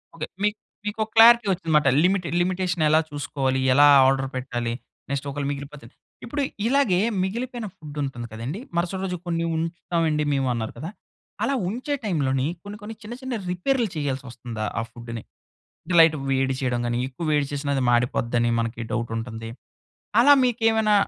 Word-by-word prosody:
Okay. 155 Hz, -1 st, -4 dB, 0.2 s
మీక్ 210 Hz, +1 st, +1 dB, 0.3 s
మీకొక 215 Hz, +1 st, -2 dB
clarity 235 Hz, 0 st, +8 dB
ఒచ్చిందన్నమాట. 160 Hz, -5 st, +1 dB, 0.2 s
Limit, 185 Hz, 0 st, +2 dB, 0.2 s
limitation 180 Hz, -2 st, 0 dB
ఎలా 155 Hz, +1 st, +5 dB
చూసుకోవాలి? 140 Hz, -3 st, -1 dB
ఎలా 145 Hz, +2 st, +7 dB, 0.2 s
ఆర్డర్ 135 Hz, 0 st, +1 dB
పెట్టాలి? 120 Hz, -2 st, -3 dB, 0.4 s
నెక్స్ట్ 140 Hz, 0 st, -2 dB
ఒకళ 140 Hz, +1 st, -4 dB
మిగిలిపోతే. 140 Hz, -2 st, -8 dB, 0.4 s
ఇప్పుడు 285 Hz, +5 st, -3 dB, 0.3 s
ఇలాగే 245 Hz, -8 st, +3 dB, 0.2 s
మిగిలిపోయిన 235 Hz, +4 st, -3 dB
ఫుడ్ 150 Hz, -1 st, -10 dB
ఉంటుంది 120 Hz, -4 st, -5 dB
కదండీ! 120 Hz, -, -5 dB, 0.2 s
మరుసటి 180 Hz, +2 st, -1 dB
రోజు 180 Hz, -1 st, -3 dB
కొన్ని 170 Hz, -1 st, 0 dB
ఉంచుతామండి 165 Hz, -1 st, -1 dB
మేము 135 Hz, -1 st, +1 dB
అన్నారు 110 Hz, -2 st, -3 dB
కదా! 160 Hz, -, -5 dB, 0.5 s
అలా 275 Hz, -, +1 dB, 0.2 s
ఉంచే 255 Hz, +7 st, -3 dB
టైంలోని 135 Hz, -9 st, 0 dB, 0.2 s
కొన్ని 205 Hz, +1 st, -8 dB
కొన్ని 215 Hz, +2 st, -7 dB
చిన్న 215 Hz, +3 st, -7 dB
చిన్న 260 Hz, -1 st, -3 dB, 0.2 s
రిపేరులు 230 Hz, +6 st, 0 dB
చేయాల్సి 140 Hz, -3 st, -2 dB
ఒస్తుందా 115 Hz, -3 st, -5 dB
ఆ -, -, +1 dB
ఫుడ్‌ని? 115 Hz, -1 st, -8 dB, 0.6 s
అంటే, 180 Hz, -, -3 dB
లైట్‌గా 155 Hz, -3 st, +5 dB
వేడి 135 Hz, 0 st, +1 dB
చేయడం 125 Hz, -3 st, 0 dB
గాని, 120 Hz, 0 st, -1 dB
ఎక్కువ 135 Hz, +6 st, -7 dB
వేడి 145 Hz, -1 st, +2 dB
చేసిన 145 Hz, 0 st, -3 dB
అది 135 Hz, -, 0 dB
మాడిపోద్దని 120 Hz, 0 st, +1 dB
మనకి 115 Hz, 0 st, -3 dB
డౌటు 115 Hz, -1 st, -2 dB
ఉంటుంది. 115 Hz, -1 st, -6 dB, 0.7 s
అలా 285 Hz, +4 st, +7 dB
మీకేమైనా 225 Hz, -3 st, +2 dB
150 Hz, 155 wpm, -24 LUFS, 130-200 Hz, 0.7 s, clarity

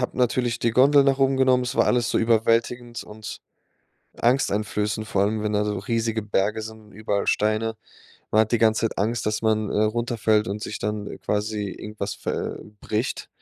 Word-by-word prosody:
Hab 125 Hz, -, -2 dB
natürlich 125 Hz, -1 st, +1 dB
die 115 Hz, -, +1 dB
Gondel 140 Hz, +3 st, +6 dB
nach 135 Hz, -1 st, +2 dB
oben 135 Hz, 0 st, +3 dB
genommen, 130 Hz, -1 st, +4 dB
es 125 Hz, -, -4 dB
war -, -, +4 dB
alles 120 Hz, -2 st, +2 dB
so -, -, +2 dB
überwältigend 115 Hz, +1 st, +1 dB
und 110 Hz, +1 st, -8 dB, 0.8 s
angsteinflößend, 105 Hz, -3 st, 0 dB
vor 100 Hz, -2 st, +1 dB
allem, 105 Hz, +1 st, 0 dB
wenn 105 Hz, 0 st, -1 dB
da 105 Hz, 0 st, +1 dB
so 105 Hz, 0 st, -2 dB
riesige 115 Hz, +2 st, -1 dB
Berge 105 Hz, +1 st, 0 dB
sind 110 Hz, 0 st, -8 dB
und 105 Hz, -1 st, -19 dB
überall 105 Hz, -1 st, -2 dB
Steine. 110 Hz, +1 st, +1 dB, 0.6 s
Man 110 Hz, +1 st, +5 dB
hat 110 Hz, -, -4 dB
die 120 Hz, -, +3 dB
ganze 110 Hz, -1 st, +3 dB
Zeit -, -, -9 dB
Angst, 110 Hz, +3 st, 0 dB
dass 105 Hz, 0 st, 0 dB
man, 110 Hz, -1 st, +1 dB
äh, 105 Hz, -, +1 dB
runterfällt 110 Hz, -1 st, +1 dB
und 105 Hz, +1 st, -4 dB
sich 110 Hz, -, -5 dB
dann, 105 Hz, 0 st, -3 dB
äh, -, -, -7 dB
quasi 105 Hz, 0 st, -2 dB
irgendwas 105 Hz, -1 st, -5 dB
ver -, -, -4 dB
äh, -, -, -10 dB, 0.2 s
bricht, 110 Hz, +4 st, -3 dB
110 Hz, 195 wpm, -24 LUFS, 105-120 Hz, 0.8 s, Gondel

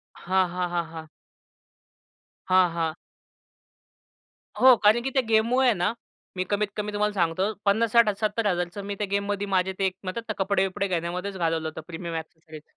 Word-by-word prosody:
हां, 185 Hz, +1 st, +1 dB
हां, 180 Hz, 0 st, -2 dB
हां, 175 Hz, -1 st, -1 dB
हां. 160 Hz, -1 st, -8 dB, 1.4 s
हां, 185 Hz, -1 st, +4 dB
हां. 165 Hz, -1 st, -1 dB, 1.6 s
हो. 260 Hz, 0 st, +8 dB
कारण 215 Hz, +3 st, +5 dB
की 270 Hz, -, -1 dB
त्या 265 Hz, -, +3 dB
गेममुळे 235 Hz, +4 st, +3 dB
आहे 240 Hz, -, +5 dB
ना 180 Hz, +6 st, +1 dB, 0.4 s
मी 185 Hz, -, -1 dB
कमीत 205 Hz, 0 st, +1 dB
कमी 210 Hz, 0 st, -3 dB
तुम्हाला 210 Hz, 0 st, 0 dB
सांगतो 185 Hz, +3 st, 0 dB
₹50,000-60,000-70,000चं 210 Hz, -3 st, +1 dB
मी 200 Hz, 0 st, -4 dB
त्या 205 Hz, 0 st, -3 dB
गेममध्ये 200 Hz, 0 st, -1 dB
माझे 190 Hz, -1 st, +1 dB
ते 195 Hz, -, +2 dB, 0.5 s
कपडे-बिपडे 195 Hz, 0 st, 0 dB
घेण्यामध्येच 180 Hz, +2 st, -3 dB
घालवलं 165 Hz, -2 st, 0 dB
होतं 160 Hz, 0 st, -8 dB
प्रीमियम 170 Hz, 0 st, -6 dB
एक्सेसरीज. 160 Hz, -1 st, -8 dB
190 Hz, 140 wpm, -26 LUFS, 175-210 Hz, 1.6 s, हो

